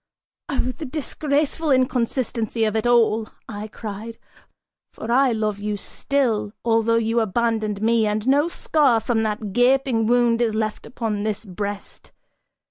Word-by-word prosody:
"Oh 260 Hz, -2 st, 0 dB
the 310 Hz, -, -6 dB
disgraceful 300 Hz, +2 st, -1 dB
inconsistency 245 Hz, -3 st, 0 dB
of 215 Hz, 0 st, -1 dB
it 220 Hz, +2 st, +1 dB
all," 225 Hz, -2 st, +3 dB, 0.2 s
I 210 Hz, -1 st, -6 dB
cried, 220 Hz, +1 st, -7 dB, 0.8 s
"for 225 Hz, -, -5 dB
I 260 Hz, +1 st, +4 dB
love 215 Hz, -2 st, -1 dB
you 210 Hz, 0 st, -2 dB
still, 225 Hz, -2 st, -1 dB
although 230 Hz, 0 st, +3 dB
you 230 Hz, +1 st, +1 dB
abandoned 220 Hz, -1 st, 0 dB
me, 225 Hz, -1 st, +3 dB
and 210 Hz, +2 st, -2 dB
no 285 Hz, +4 st, +4 dB
scar 290 Hz, -8 st, +2 dB
from 225 Hz, 0 st, 0 dB
that 210 Hz, -2 st, -3 dB
gaping 245 Hz, -2 st, +3 dB
wound 240 Hz, -1 st, +3 dB
is 225 Hz, -2 st, +1 dB
left 215 Hz, -1 st, -2 dB
upon 225 Hz, -4 st, -3 dB
this 215 Hz, +1 st, -3 dB
breast! 200 Hz, +1 st, -6 dB
225 Hz, 140 wpm, -22 LUFS, 215-250 Hz, 0.8 s, I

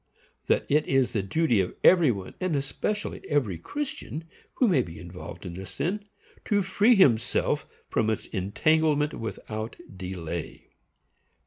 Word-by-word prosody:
That -, -, +2 dB
it 150 Hz, +2 st, +2 dB
is 135 Hz, -2 st, +3 dB
the 105 Hz, -, +1 dB
duty 120 Hz, +2 st, +2 dB
of 90 Hz, -, -3 dB
every 175 Hz, -5 st, +7 dB
one, 100 Hz, -5 st, -3 dB
and 185 Hz, -4 st, 0 dB
especially 145 Hz, +10 st, -2 dB
of -, -, -25 dB
every 120 Hz, -, 0 dB
Christian, 275 Hz, -, -4 dB, 0.3 s
who 250 Hz, -, +3 dB
may 170 Hz, -11 st, +4 dB
be 80 Hz, -8 st, -8 dB
involved 90 Hz, +3 st, -9 dB
in 90 Hz, -, -5 dB
this 95 Hz, +2 st, -7 dB
sin, 200 Hz, +5 st, -2 dB, 0.4 s
to 205 Hz, -2 st, +2 dB
free 205 Hz, +5 st, +4 dB
himself 125 Hz, -, +3 dB, 0.2 s
from 110 Hz, -, +1 dB
its 110 Hz, -, -1 dB
entanglement 150 Hz, -, +1 dB
without 110 Hz, 0 st, -5 dB, 0.2 s
delay. 90 Hz, -3 st, -6 dB
135 Hz, 145 wpm, -27 LUFS, -, 0.4 s, every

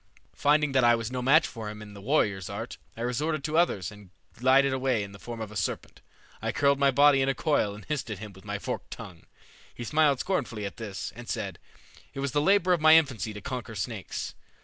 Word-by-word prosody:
"Finding 150 Hz, 0 st, +3 dB
that 130 Hz, -1 st, +3 dB
I 120 Hz, 0 st, +6 dB
was 115 Hz, 0 st, -4 dB
no 125 Hz, -1 st, -2 dB
match 145 Hz, +6 st, +5 dB
for 110 Hz, -3 st, -6 dB
him 105 Hz, 0 st, -8 dB
in 105 Hz, -1 st, -10 dB
the 100 Hz, -, -11 dB
warrior's 100 Hz, -7 st, +1 dB
art, 110 Hz, +4 st, -6 dB, 0.2 s
I -, -, -6 dB
resorted 140 Hz, +5 st, -1 dB
to 155 Hz, +1 st, -2 dB
others 105 Hz, -, +1 dB
and 105 Hz, -2 st, -14 dB, 0.2 s
glided 130 Hz, +2 st, +4 dB
away 130 Hz, -4 st, +1 dB
in 100 Hz, -, -8 dB
the 100 Hz, -, -12 dB
form 120 Hz, +1 st, -7 dB
of 110 Hz, -2 st, -5 dB
a -, -, -10 dB
serpent. 95 Hz, -, -3 dB, 0.4 s
I -, -, -1 dB
curled 140 Hz, -1 st, +2 dB
my 140 Hz, -1 st, +5 dB
body 140 Hz, 0 st, +5 dB
in 135 Hz, -, +2 dB
a 135 Hz, -, +1 dB
coil 125 Hz, -10 st, +1 dB
and 105 Hz, -2 st, -12 dB
hissed 145 Hz, -2 st, -3 dB
at 105 Hz, -, -4 dB
him 105 Hz, +1 st, -9 dB
with 95 Hz, -, -15 dB
my 105 Hz, 0 st, -3 dB
forked 125 Hz, +5 st, -5 dB
tongue. 95 Hz, -8 st, -10 dB, 0.5 s
He 120 Hz, -, -6 dB
smiled 145 Hz, +1 st, +3 dB
scornfully 125 Hz, -, -2 dB
at 100 Hz, -, -6 dB
this, 105 Hz, -5 st, -5 dB
and -, -, -10 dB
said, -, -, -3 dB, 0.6 s
'It -, -, -5 dB
was 140 Hz, -1 st, -1 dB
the 145 Hz, -, +2 dB
labor 185 Hz, +1 st, +4 dB
of 170 Hz, -, 0 dB
my 155 Hz, 0 st, +8 dB
infancy 130 Hz, -8 st, +2 dB
to 105 Hz, -1 st, -8 dB
conquer 125 Hz, -3 st, -5 dB
snakes.' 105 Hz, 0 st, -4 dB
125 Hz, 235 wpm, -28 LUFS, 105-140 Hz, 0.6 s, my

